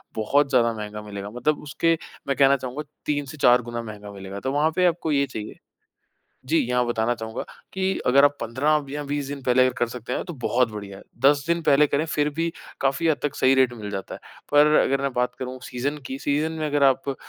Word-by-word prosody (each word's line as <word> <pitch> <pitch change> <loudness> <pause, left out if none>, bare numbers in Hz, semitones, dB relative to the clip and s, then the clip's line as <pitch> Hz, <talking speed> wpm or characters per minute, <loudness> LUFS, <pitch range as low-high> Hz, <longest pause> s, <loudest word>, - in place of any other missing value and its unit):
बहुत 140 +6 +2
ज़्यादा 115 -2 +3
महँगा 105 -1 -6
मिलेगा 100 -1 -7
मतलब 125 +7 -1
उसके 165 +3 +1 0.3
मैं 140 - +1
कहना 140 0 +5
चाहूँगा 130 +4 -5 0.2
3 145 -1 -1
से 150 +3 -10
4 125 -2 +5
गुना 120 0 -5
महँगा 105 -2 -9
मिलेगा 100 0 -8
तो 130 - -2
वहाँ 150 +3 +2
पे 180 -1 +3
आपको 165 -2 +1
ये 140 -1 +3
चाहिए। 110 -4 -7 0.9
जी। 160 +5 +2
यहाँ 125 -1 +1
बताना 120 0 0
चाहूँगा 110 0 -5 0.3
कि 190 0 0
अगर 140 +3 +5
आप 145 0 +2
15 140 +6 +1
या 145 +1 -4
20 145 -1 -3
दिन 140 -1 -6
पहले 125 0 +3
अगर 130 - +1
कर 120 - +1
सकते 125 +1 -6
हैं - - -2
तो 175 - -6
बहुत 120 -2 +2
बढ़िया 100 -2 -8
है। - - -13 0.2
10 145 0 +5
दिन 170 0 +1
पहले 150 -1 +4
करें 150 +4 0
फिर 150 -1 0
भी 165 0 0 0.3
काफ़ी 135 +4 +1
हद 155 -3 +3
तक 145 - -1
सही 130 0 +4
रेट 130 -2 +3
मिल 105 -3 -7
जाता 95 -1 -5
है। - - -11 0.3
पर 145 +1 +6
अगर 135 0 +1
मैं 140 -1 -1
बात 125 0 0
करूँ 130 0 -5
सीज़न 135 +4 -3
की 130 - -5
सीज़न 150 +3 0
में 155 - -1
अगर 145 -1 +1
आप 135 +1 +3
अ, 135 - -2
135 Hz, 235 wpm, -24 LUFS, 120-145 Hz, 0.9 s, पर